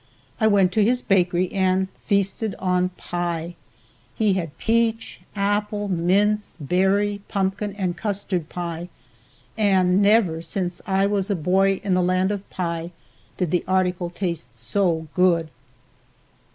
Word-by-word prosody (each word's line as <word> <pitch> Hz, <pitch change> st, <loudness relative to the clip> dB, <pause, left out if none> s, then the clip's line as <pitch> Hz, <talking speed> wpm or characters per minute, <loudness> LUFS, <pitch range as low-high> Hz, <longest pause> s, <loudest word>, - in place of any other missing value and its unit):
I 220 Hz, -, +4 dB
went 195 Hz, -3 st, +4 dB
to 215 Hz, +3 st, +3 dB
his 245 Hz, +4 st, +1 dB
bakery 180 Hz, -2 st, +2 dB
and 190 Hz, -1 st, +1 dB, 0.2 s
feasted 200 Hz, +1 st, 0 dB
on 180 Hz, -1 st, +1 dB
pie. 175 Hz, -1 st, -3 dB, 0.6 s
He 215 Hz, -3 st, +2 dB
had 165 Hz, -5 st, -3 dB
peach, 230 Hz, 0 st, 0 dB
apple, 205 Hz, 0 st, -1 dB
mince, 200 Hz, +4 st, +1 dB
berry, 195 Hz, +6 st, +1 dB
pumpkin 200 Hz, +1 st, -1 dB
and 185 Hz, -4 st, -2 dB
custard 195 Hz, -4 st, -2 dB
pie, 170 Hz, 0 st, -5 dB, 0.7 s
and 190 Hz, -3 st, +3 dB
never 200 Hz, -6 st, +3 dB
since 180 Hz, 0 st, -4 dB
I 195 Hz, 0 st, +2 dB
was 200 Hz, 0 st, 0 dB
a 200 Hz, -, +1 dB
boy 190 Hz, +3 st, +2 dB
in 195 Hz, -2 st, 0 dB
the 180 Hz, -, +3 dB
land 185 Hz, +2 st, +1 dB
of 200 Hz, -1 st, -5 dB
pie 170 Hz, -2 st, -3 dB, 0.5 s
did 180 Hz, -4 st, -1 dB
the 180 Hz, -, +1 dB
article 180 Hz, -2 st, 0 dB
taste 175 Hz, -2 st, -4 dB
so 170 Hz, -5 st, 0 dB
good. 170 Hz, -3 st, +2 dB
190 Hz, 135 wpm, -23 LUFS, 175-205 Hz, 0.7 s, I